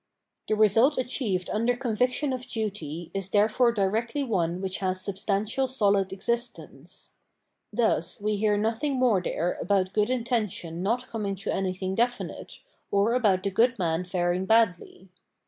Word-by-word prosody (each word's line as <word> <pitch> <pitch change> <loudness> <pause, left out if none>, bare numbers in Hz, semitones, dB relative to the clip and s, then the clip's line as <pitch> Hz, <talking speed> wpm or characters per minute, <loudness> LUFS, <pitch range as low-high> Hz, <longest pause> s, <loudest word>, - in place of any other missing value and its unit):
The 215 - +1
result 225 +7 +4
achieved 235 -8 -1
under 230 +3 +1
conviction 250 +3 0
of 255 -1 -5
duty 175 -7 -4
is 195 -1 -3
therefore 215 +4 +3
directly 225 +6 -1
one 180 -8 -1
which 190 0 -3
has 185 -1 -1
substantial 200 +6 -1
solid 200 -6 +2
ex 190 - -7
istence. 180 - -4 0.6
Thus, 220 -7 +1
we 210 +1 0
hear 210 0 +1
nothing 230 +7 0
more 245 -7 +3
there 175 0 -2
about 190 0 +1
good 210 +1 +2
intention 220 -9 -2
not 235 +6 -1
coming 205 -4 -3
to 195 - -3
anything 190 0 -2
defimte, 245 +2 0
ox - - -11 0.5
about 205 -7 +2
the 200 - -1
good 240 +6 +3
in 180 - 0
an 165 +2 0
faring 180 0 -1
badly. 190 -4 +1
210 Hz, 150 wpm, -27 LUFS, 185-235 Hz, 0.6 s, result